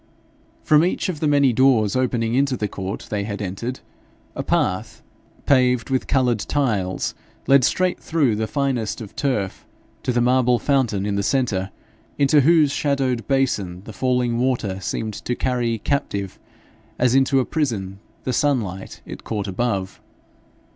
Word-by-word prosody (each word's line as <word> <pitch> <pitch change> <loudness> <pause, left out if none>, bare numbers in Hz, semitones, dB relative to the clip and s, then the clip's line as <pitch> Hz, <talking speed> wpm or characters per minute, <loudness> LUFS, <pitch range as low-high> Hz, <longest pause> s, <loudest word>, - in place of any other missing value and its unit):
From 150 +1 +5
each 185 +2 0
of 165 -5 -4
the 155 - +1
many 140 -3 +4
doors 120 -4 +3
opening 120 -3 0
into 135 0 +1
the 105 - -1
court 95 0 -5
they 105 -1 -1
had 100 0 -5
entered, 105 +6 -4 0.5
a - - -2
path, - - -1 0.4
paved 125 -2 +3
with 130 - 0
coloured 125 -4 +2
tiles, 105 -9 -1 0.3
led 135 0 +5
straight 185 +7 +1
through 145 -9 +1
the 110 +1 -2
finest 135 -6 -1
of 110 -4 -9
turf 105 -9 -2 0.4
to 130 - -1
the 120 - +1
marble 125 0 +3
fountain 120 -8 +1
in 100 -1 -1
the - - +1
centre, 100 -5 0 0.5
into 145 +1 +4
whose 155 0 +4
shadowed 135 -6 0
basin 100 -10 0
the 110 - -10
falling 125 +1 0
water 120 -7 0
seemed 110 +3 -3
to 125 - -3
carry 120 -3 0
captive 100 -6 -2 0.6
as 125 -1 +2
into 135 0 +3
a 130 - +1
prison 105 - -2 0.2
the 130 - -2
sunlight 115 -10 -1
it - - -9
caught 105 -3 -3
above. 100 -1 -2
125 Hz, 155 wpm, -22 LUFS, 105-135 Hz, 0.6 s, From